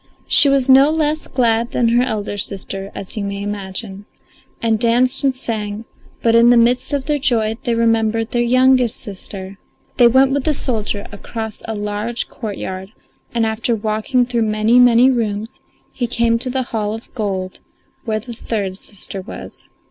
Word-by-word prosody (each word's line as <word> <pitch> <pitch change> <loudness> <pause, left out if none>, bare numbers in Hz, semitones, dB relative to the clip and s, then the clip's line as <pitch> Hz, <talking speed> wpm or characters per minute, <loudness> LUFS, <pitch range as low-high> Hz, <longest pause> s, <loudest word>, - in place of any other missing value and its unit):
She 290 - +6
was 275 -2 +3
no 270 +2 +7
less 310 0 0
glad 235 -2 +1
than 235 -2 +2
her 240 +1 +3
elder 215 -5 -2
sister, 195 0 -5
as 195 - -7
you 210 - -3
may 200 0 -4
imagine, 200 0 -5 0.5
and 225 -2 +1
danced 245 +3 +2
and 270 -2 +2
sang; 220 -3 -4 0.4
but 230 - +3
in 230 +1 +6
the 245 - +6
midst 240 +4 +3
of 280 -2 -1
their 295 -1 0
joy 225 -5 +1
they 235 - +1
remembered 225 0 +1
their 240 - +1
youngest 255 0 +3
sister. 195 -1 -6 0.4
They 240 - +7
went 265 +3 +4
with 275 -1 -1
the 305 - +2
soldier 215 -6 -2
across 220 +1 -6
a 220 - -3
large 210 +3 -3
courtyard, 195 -3 -6 0.4
and, 230 -1 +2
after 225 +2 0
walking 220 +4 0
through 240 -1 -1
many, 215 +2 +3
many 245 +1 +6
rooms, 220 -2 -3 0.3
he 245 - -3
came 230 -1 +1
to 255 - 0
the 260 +1 -1
hall 215 -1 -1
of 225 - -12
gold 190 -5 -3 0.4
where 220 -3 -1
the 235 +2 -9
third 200 -4 -4
sister 195 -1 -5
was. - - -10
230 Hz, 170 wpm, -18 LUFS, 210-245 Hz, 0.5 s, no